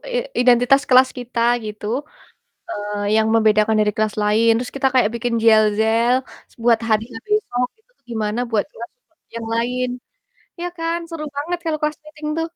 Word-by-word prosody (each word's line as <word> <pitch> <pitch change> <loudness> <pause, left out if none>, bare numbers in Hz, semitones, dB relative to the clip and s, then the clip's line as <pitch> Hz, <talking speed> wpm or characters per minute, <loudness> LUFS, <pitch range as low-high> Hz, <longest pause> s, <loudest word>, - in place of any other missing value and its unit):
i - - +2 0.2
identitas 250 +3 +4
kelas 255 0 +6
kita, 245 -1 -4 0.2
gitu, 210 0 -7 0.9
eee, 205 -3 -2
yang 220 0 +3
membedakan 215 0 +3
dari 210 0 +2
kelas 215 -1 0
lain, 220 +2 +3
terus 245 +1 -5
kita 270 -1 +2
kayak 245 -5 +4
bikin 235 0 -2
yel-yel 220 +2 +4 0.4
s - - -23
buat 235 -2 +5
harinya 225 +1 -1
besok, 250 - 0
itu 470 +3 -37
tuh - - -46
gimana 220 0 -2
buat 215 -3 +1
kelas 235 +1 -9 0.5
yang 230 -1 -5
lain. 250 +2 -1 0.7
Iya 350 - -3
kan, 330 +1 -1
seru 325 -2 -5
banget 325 +5 -2
kalau 310 -1 -1
class 300 0 -1
meeting 305 0 -7
tuh. 325 0 -2
235 Hz, 165 wpm, -20 LUFS, 220-275 Hz, 0.9 s, kelas